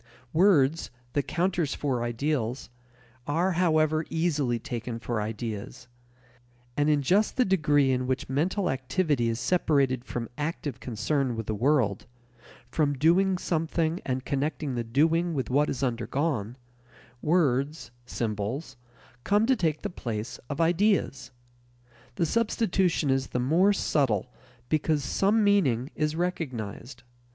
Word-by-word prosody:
Words, 165 -4 +3 0.2
the 145 - +2
counters 175 -1 -1
for 130 -5 -1
ideals, 120 0 -2 0.6
are, 170 +6 +1
however, 155 -3 +2
easily 150 -7 0
taken 115 0 -5
for 115 -2 -3
ideas. 110 +2 -5 0.9
And 145 +1 +2
in 145 -2 +2
just 200 +10 +2
the 255 - +4
degree 150 -7 +3
in 125 0 0
which 130 0 -1
mental 175 +8 0
activity 135 -1 0
is 115 0 -2
separated 135 -3 +1
from 120 -2 -4
active 145 -4 -3
concern 125 +2 -1
with 115 -1 -4
the 110 - -2
world, 120 -3 +1 0.6
from 145 +3 +1
doing 180 +6 +3
something 165 0 -1
and 130 0 -3
connecting 145 0 -2
the 120 -1 -2
doing 160 +8 +1
with 130 -4 -2
what 145 +3 +3
is 135 - -3
undergone, 120 -1 -1 0.6
words, 140 -5 +1 0.2
symbols, 110 +6 -3 0.5
come 205 +2 +3
to 260 +2 +3
take 160 - -1
the - - -2
place 115 -6 -5
of 145 - -4
ideas. 175 -2 +1 0.9
The 170 - +1
substitution 190 - +1
is 135 -1 0
the 125 - -2
more 165 +11 +3
subtle 130 - 0 0.3
because 155 0 +1
some 205 +10 +2
meaning 150 - +2
is 155 0 -1
recognized. 125 - -4
145 Hz, 130 wpm, -27 LUFS, 125-165 Hz, 0.9 s, the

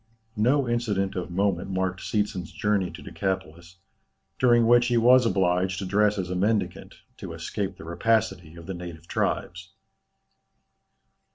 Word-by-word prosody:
No 130 +3 +3
incident 105 -5 -1
of 90 -1 -4
moment 95 0 0
marked 95 -1 -2
Seetzen's 105 -4 -2
journey 105 -3 0
to - - -11
Decapolis, 90 -2 -4 0.6
during 120 -2 +5
which 120 +1 +5
he 120 -1 +2
was 125 +1 +6
obliged 95 -1 +1
to 95 - -4
dress 105 +2 +2
as 90 -2 -3
a - - -2
mendicant, 105 +4 -1 0.2
to - - -7
escape 95 -2 -4
the - - -11
rapacity 90 -2 0
of 85 -1 -11
the 95 - -5
native 85 -2 -9
tribes. 95 +2 -2
95 Hz, 145 wpm, -26 LUFS, 90-110 Hz, 0.6 s, was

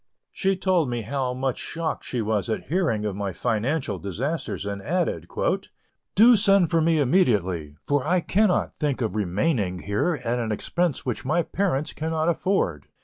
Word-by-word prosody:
She 195 -1 +1
told 180 -6 +2
me 120 -2 -2
how 130 +2 -2
much 130 -1 -2
shocked 165 -1 -3
she 120 -3 -2
was 105 -3 -1
at 110 - -3
hearing 155 - +1
of 105 -3 -2
my 100 -1 -2
financial 120 - -1
disasters, 120 - -3
and 100 0 -4
added: 155 - -1 0.9
"Do 235 +4 +8
send 195 -4 +4
for 165 -1 +3
me 165 0 +3
immediately, 100 - +1
for 145 -2 +1
I 180 +6 +2
cannot 190 +2 +1
think 145 -4 -1
of 110 -3 -1
remaining 100 - 0
here 105 - -1
at 120 +1 0
an 115 -2 -2
expense 170 +8 -1
which 125 0 -2
my 155 +6 +1
parents 160 -6 -1
cannot 160 +1 -1
afford. 170 - 0
135 Hz, 165 wpm, -25 LUFS, 105-170 Hz, 0.9 s, Do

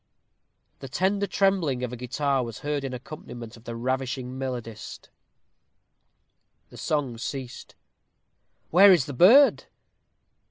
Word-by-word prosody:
The 135 - -9
tender 195 +7 0
trembling 185 -12 +1
of 125 -1 -4
a - - -3
guitar 135 +2 -1
was 115 -2 -8
heard 145 -1 -2
in 135 - -4
accompaniment 120 -3 -9
of 115 - -18
the 115 - -6
ravishing 130 +1 -3
melodist. 125 -4 -7 1.6
The - - -14
song 140 -7 -2
ceased. 130 0 -7 1.0
"Where 195 +4 +8
is 170 -9 +4
the 145 - -7
bird?" 235 - +6
130 Hz, 120 wpm, -25 LUFS, 125-155 Hz, 1.6 s, Where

